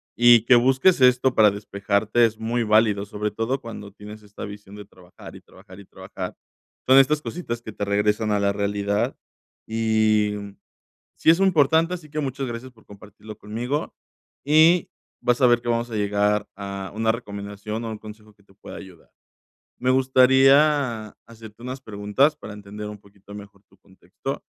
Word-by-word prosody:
Y 120 -1 +6
que 125 - +6
busques 130 +6 +3
esto 125 0 +4
para 105 -2 +5
despejarte 100 +3 0
es 110 -1 -3
muy 115 +1 -1
válido, 105 -2 +2
sobre 105 +1 -4
todo 115 +5 -2
cuando 105 -4 -10
tienes 105 +1 -12
esta 105 0 -9
visión 100 -1 -11
de 105 -1 -10
trabajar 90 -2 -15
y - - -13
trabajar 90 +1 -17
y - - -16
trabajar. 95 -1 -8 0.5
Son 130 - +6
estas 150 +3 +4
cositas 120 -11 -6
que 110 -2 -9
te 105 - -5
regresan 105 +2 0
a 105 - +1
la 100 0 +1
realidad 100 0 -1 0.5
y, 110 -2 +1
mm, 100 -1 -8 0.7
sí - - +2
es 165 - +5
importante, 165 -2 +3
así 160 -4 -8
que 155 +1 -4
muchas 135 -1 -3
gracias 120 +2 -7
por 110 -3 -24
compartirlo 105 +1 -13
conmigo. 120 +8 -4 0.5
Y 160 +4 +4 0.3
vas 120 +2 0
a 125 - +6
ver 120 -1 +3
que 120 - -10
vamos 115 +1 -1
a - - -4
llegar 105 0 0
a 100 -1 -7
una 110 0 +1
recomendación 105 0 -7
o 115 - -5
un 110 - -6
consejo 105 0 -13
que 100 - -29
te 95 - -25
pueda 100 - -11
ayudar. 95 -3 -14 0.7
Me 130 +1 +1
gustaría 130 -2 +3
hacerte 110 -1 -14
unas 130 +2 -7
preguntas 110 +8 0
para 110 - -10
entender 105 +1 -9
un 105 - -8
poquito 100 0 -16
mejor 100 -1 -13
tu - - -26
contexto - - -9
110 Hz, 175 wpm, -23 LUFS, 105-125 Hz, 0.7 s, Y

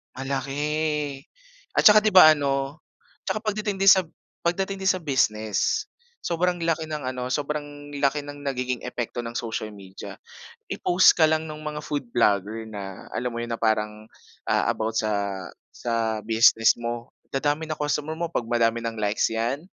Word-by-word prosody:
Malaki. 145 +2 -2 0.6
At - - +3
tsaka 210 0 +9
'di 215 -2 +1
ba 155 -4 +10
ano 140 +1 -1 0.5
tsaka 215 - -2
pagdating 210 -2 -2
sa 190 -3 +6 0.4
pagdating 195 +3 0
din 190 - +3
sa 185 -1 -3
business, 130 - 0 0.3
sobrang 175 0 0
laki 165 -1 0
ng 155 -1 -5
ano 125 -1 -3
sobrang 145 0 -4
laki 140 +1 +1
ng 145 0 -10
nagiging 125 -2 -2
epekto 120 -1 -4
ng 115 - -6
social 110 -2 -4
media. 95 -1 -10 0.6
I-post 180 +1 +5
ka 160 -2 +4
lang 160 0 +1
nung 155 -1 -8
mga 150 0 -5
food 140 -5 -3
vlogger 110 -1 +1
na 100 -3 -8
alam 125 - -2
mo - - -2
yun 120 0 -4
na 115 - -4
parang, 110 -1 0 0.4
ah, - - +2
about 110 0 -3
sa 100 -3 -1 0.3
sa 115 -2 -1
business 110 0 +5
mo 120 0 -5 0.2
dadami 145 +3 0
na 155 - -3
customer 150 +1 -2
mo 170 0 -3
pag 120 - -2
madami 115 -1 +2
ng 115 -1 -4
likes 105 0 +1
'yan 115 +4 -1
135 Hz, 160 wpm, -25 LUFS, 115-155 Hz, 0.6 s, ba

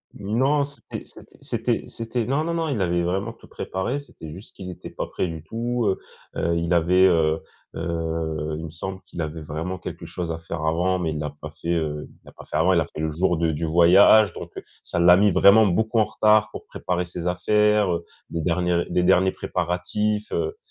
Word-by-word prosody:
Non, 130 +7 +1
c'était 145 0 -8
c'était - - -16
c'était - - -2
c'était 115 0 -3
non 140 +4 0
non 170 +1 -2
non 165 -1 -1
il 115 -8 -1
avait 85 -1 +1
vraiment 95 +6 -1
tout 115 - -17
préparé 105 +10 -3
c'était 80 - -11
juste 95 +5 -12
qu'il 90 -2 -7
était - - -9
pas - - -4
prêt 90 - -2
du 80 -2 -7
tout, 120 +5 -2
heu 95 - 0 0.4
heu, 85 0 0
il 85 +1 0
avait, 90 +3 +4
heu 80 -2 +2 0.3
heu, 80 -2 -3
il 80 - -6
me 80 - -8
semble 95 +3 -6
qu'il 85 - -7
avait 80 0 -5
vraiment 80 +5 -4
quelque 85 -2 -8
chose 85 -1 -4
à 80 - -4
faire 80 -1 -5
avant, 90 +4 +1
mais 85 -3 -1
il 75 - -4
l'a 75 -1 -3
pas 75 0 -7
fait, 85 - -4
heu, 75 -2 -2
il - - -22
l'a - - -13
pas - - -13
fait - - -3
avant, 90 +4 +4
il 85 - +4
a - - -1
fait - - -10
le 80 0 -1
jour 90 +1 +1
de 80 -1 +1
du 80 +2 -2
voyage, 90 +6 +6
donc - - -8
heu, - - -6 0.2
ça - - -4
l'a 90 +1 +7
mis 105 +2 +4
vraiment 105 +4 +6
beaucoup 110 +5 +1
en 110 - +4
retard 105 +1 +3
pour - - -9
préparer 90 0 -3
ses 85 0 -5
affaires, 105 +1 +2
heu, 85 0 -3 0.3
les 85 - -2
derniers 90 0 +1
les 90 - +1
derniers 95 +1 +4
préparatifs, 105 +4 -2
heu 420 +1 -2
90 Hz, 225 wpm, -24 LUFS, 80-105 Hz, 0.4 s, l'a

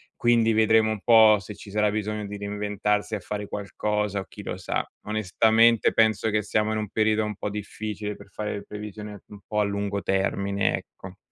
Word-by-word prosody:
Quindi 115 -1 +3
vedremo 110 0 +4
un 105 -2 -4
po' 110 -2 +7
se 100 +2 -9
ci 100 - -12
sarà 105 0 +1
bisogno 105 0 -3
di 100 0 -6
reinventarsi 105 +1 -2
a 105 - -1
fare 105 +1 -5
qualcosa 105 0 -2
o - - -9
chi 105 - -11
lo 95 - -5
sa. 90 - -2 0.2
Onestamente 110 +2 +3
penso 110 0 +3
che 105 0 +2
siamo 105 +1 0
in 110 - -1
un 105 - -4
periodo 110 0 +2
un 105 -1 -3
po' 105 - -4
difficile, 105 0 -5
per 100 -1 -15
fare 105 +3 -4
le 100 - -6
previsioni 105 0 -8
un 105 - -12
po' 105 - -1
a - - +4
lungo 100 0 -2
termine, 100 +1 0
ecco. 95 +1 -10
105 Hz, 195 wpm, -25 LUFS, 100-110 Hz, 0.2 s, po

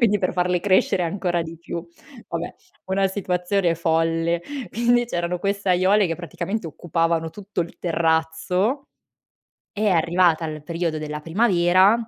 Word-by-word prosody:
quindi, 210 -4 +4
per 185 - 0
farle 180 0 +1
crescere 185 0 +2
ancora 175 -1 -1
di 165 0 -8
più. 170 0 -6 0.4
Vabbè, 170 +1 -4 0.3
una 195 +1 +2
situazione 180 -2 0
folle. 165 +1 +1 0.3
Quindi, 240 +1 +3
c'erano 175 -5 -2
queste 200 +1 -2
aiuole 185 +2 +4
che 165 - -2
praticamente 190 +3 -4
occupavano 165 0 -1
tutto 200 +1 -5
il 170 0 -5
terrazzo. 170 - 0 0.8
È 215 0 -1
arrivata 170 -2 +3
il 155 -1 -5
periodo 165 0 -2
della 150 0 -5
primavera, 185 +1 +4
175 Hz, 135 wpm, -23 LUFS, 165-195 Hz, 0.8 s, quindi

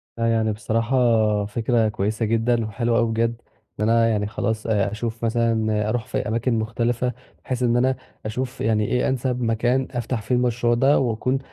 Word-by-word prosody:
فيعني 115 -1 +1
بصراحة 115 +3 -1 0.5
فكرة 115 +1 +1
كويسة 105 +2 -1
جدًا، 115 +1 +1
وحلوة 115 +2 0
أوي 115 - +2
بجد، 115 +1 -1 0.4
إن 105 +1 +1
أنا 115 0 +4
يعني 105 -2 0
خلاص 110 +1 -2
آآ 100 -3 +1
أشُوف 115 +1 -4
مثلًا 110 -2 +1
أروح 115 0 -1
في - - -3
أماكن 115 +3 0
مختلفة، 120 +2 -1 0.3
بحيث 125 -1 -2
إن 120 0 +3
أنا 130 +2 +2 0.3
أشُوف 125 +4 -4
يعني 105 -1 +1
إيه 125 - +1
أنسّب 125 -1 -1
مكان 120 +3 +1
أفتح 120 -2 -3
فيه 110 +4 0
المشروع 120 -1 +1
ده، 135 +5 +4
وأكون 125 +2 0
115 Hz, 165 wpm, -23 LUFS, 110-120 Hz, 0.5 s, أنا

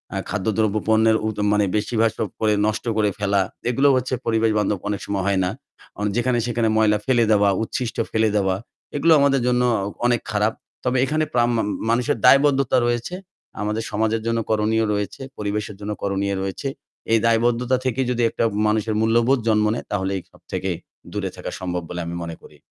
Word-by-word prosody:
আ - - -1
খাদ্যদ্রব্য 110 +1 0
পণ্যের 110 0 +4
উ - - +1 0.2
মানে 105 0 +3
বেশিরভাগ 110 +1 0 0.2
পরে 110 -1 +2
সব 105 - 0
নষ্ট 110 +3 -2
করে 105 -1 +3
ফেলা। 100 -1 +2 0.3
এগুলো 135 +4 +3
হচ্ছে 130 +1 -1
পরিবেশ-বান্ধব 110 -3 +1
অনেক 105 -1 -2
সময় 100 -2 -1
হয় 95 -1 +2
না। - - 0 0.5
অ - - -4
যেখানে-সেখানে 120 -2 +1
ময়লা 110 -1 +4
ফেলে 120 -3 +3
দেওয়া, 100 -1 +4
উচ্ছিষ্ট 115 +1 -4
ফেলে 110 0 +2
দেওয়া 95 -2 +1 0.4
এগুলো 160 +3 +4
আমাদের 140 -2 +3
জন্য 125 0 +2 0.5
অনেক 120 -2 +2
খারাপ। 105 +1 +1 0.3
তবে 125 +1 +1
এখানে 155 +3 0
প্রাম্মাম 120 -2 +2 0.2
মানুষের 120 0 +1
দায়বদ্ধতা 140 -2 +5
রয়েছে। 120 +8 -1 0.5
আমাদের 105 +2 -1
সমাজের 110 +1 0
জন্য 115 0 +1
করণীয় 110 +1 +2
রয়েছে। 105 +5 -3 0.2
পরিবেশের 105 0 -3
জন্য 105 +1 -4
করণীয় 100 0 -1
রয়েছে। 95 +8 -4 0.4
এই 115 - +5
দায়বদ্ধতা 120 +2 +2
থেকে 130 0 0
যদি 120 -1 0
একটা - - -2 0.2
মানুষের 110 0 0
মূল্যবোধ 120 +4 +3
জন্ম 105 -1 +3
নেয় 120 - -5
তাহলে 95 -1 -1
এই 90 - -7
সব - - -21
থেকে 95 - -2 0.4
দূরে - - -2
থাকা - - -6
সম্ভব 90 -1 -3
বলে 90 - -5
আমি 85 - -5
মনে 85 -1 -6
করি। - - -16
110 Hz, 175 wpm, -22 LUFS, 105-120 Hz, 0.5 s, দায়বদ্ধতা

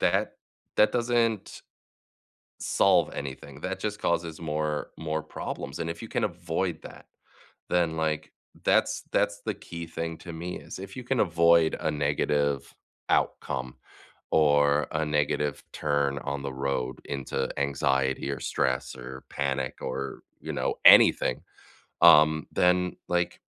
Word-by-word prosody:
that - - +1 0.4
that 105 - +5
doesn't 115 -3 0 1.0
solve - - +3
anything. 70 0 -7
That 95 0 -3
just 105 +1 -3
causes 85 -3 -1
more 75 -1 -2
more 80 -1 -3
problems, 70 -2 -6
and 85 0 -2
if 85 - -6
you 115 - -7
can - - -1
avoid 85 +1 -3
that, - - -11 0.6
then, 85 -2 +1
like, 80 -1 -1 0.3
that's - - +2
that's - - +1
the - - 0
key 85 0 -8
thing 80 0 -4
to 85 - -8
me 85 +2 -5
is - - -9
if 95 0 -8
you 125 - -5
can 125 +1 -1
avoid 85 -2 +4
a 80 - 0
negative 70 -1 0 0.4
outcome 65 -1 0 0.6
or 75 -1 +4
a 75 0 0
negative 75 -1 0
turn 70 -2 0
on 70 0 -4
the 70 -1 -4
road 65 -1 -2
into 70 -2 -3
anxiety 70 -1 0
or 70 -3 -4
stress 65 0 -1
or 65 +1 -9
panic 70 -1 -2
or, 70 0 -4 0.2
you - - -5
know, - - -1
anything, - - +7 0.6
um, 80 -2 +7
then, 90 0 +3 0.2
like 90 0 0
75 Hz, 140 wpm, -27 LUFS, 70-85 Hz, 1.0 s, anything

